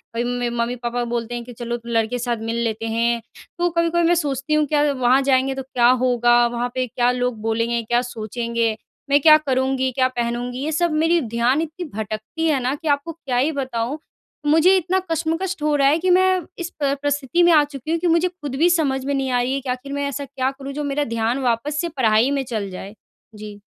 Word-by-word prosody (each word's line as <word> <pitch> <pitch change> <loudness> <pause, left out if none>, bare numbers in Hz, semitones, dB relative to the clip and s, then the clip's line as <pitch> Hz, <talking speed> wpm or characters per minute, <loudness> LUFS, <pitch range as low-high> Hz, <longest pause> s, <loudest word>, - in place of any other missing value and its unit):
कभी 235 - 0
में 245 0 -1
मम्मी-पापा 240 0 -2
बोलते 235 0 -3
हैं 240 - -5
कि 245 0 -11
चलो 240 0 -4
लड़के 225 -2 +1
के 245 +2 -3
साथ 240 -1 -1
मिल 225 +1 -3
लेते 225 0 -2
हैं। 230 +1 0 0.4
तो 350 0 +2
कभी-कभी 335 0 +1
मैं 350 - +4
सोचती 285 -2 -2
हूँ 305 0 +3
कि 295 0 +3
वहाँ 255 0 +3
जाएँगे 265 0 +2
तो 270 - -4
क्या 245 -2 +2
होगा? 240 -1 +3
वहाँ 240 +1 -2
पे 255 0 0
क्या 240 +1 +1
लोग 250 -2 -2
बोलेंगे? 230 +1 0
क्या 240 +2 +1
सोचेंगे? 230 -1 -2 0.3
मैं 285 +1 +5
क्या 310 0 +8
करूँगी 260 -2 0
क्या 255 +1 +2
पहनूँगी? 245 0 -3
ये 315 - -1
सब 340 +1 +1
मेरी 325 +3 +2
ध्यान 240 +5 +1
इतनी 330 +2 -5
भटकती 220 - -3
है 290 -4 +2
ना 260 +3 0
कि 315 +2 -8
आपको 285 +3 0
क्या 275 -6 -4
ही 285 +6 +2
बताऊँ? 260 -1 -3 0.5
मुझे 325 +6 +5
इतना 370 +2 0
कशमकश 330 +4 -1
हो 300 -1 +2
रहा 275 -1 +3
है 300 +3 +4
कि - - +3
मैं 370 0 +4 0.2
इस 345 0 -4
प 280 0 +1
परिस्थिति 290 +4 +1
में 345 - +5
आ 300 -1 +6
चुकी 290 +1 -6
हूँ 335 - +1
कि 355 - 0
मुझे 335 +2 +3
ख़ुद 295 -7 -7
भी 335 +5 +3
समझ 275 -6 +1
में 280 - -1
नहीं 270 -1 -1
आ 245 0 +2
रही 255 +2 -1
है 275 - -1
कि 260 - -7
आख़िर 260 +3 -4
मैं 285 0 -1
ऐसा 280 0 -4
क्या 265 0 -2
करूँ 275 0 -8
जो 295 +1 -4
मेरा 285 +1 -1
ध्यान 230 +4 0
वापस 265 +6 0
से 340 - -2
पढ़ाई 240 -2 +2
में 275 -1 0
चल 210 -4 -3
जाए, 195 +3 -9 0.4
जी। 210 -1 -9
265 Hz, 230 wpm, -21 LUFS, 240-300 Hz, 0.5 s, क्या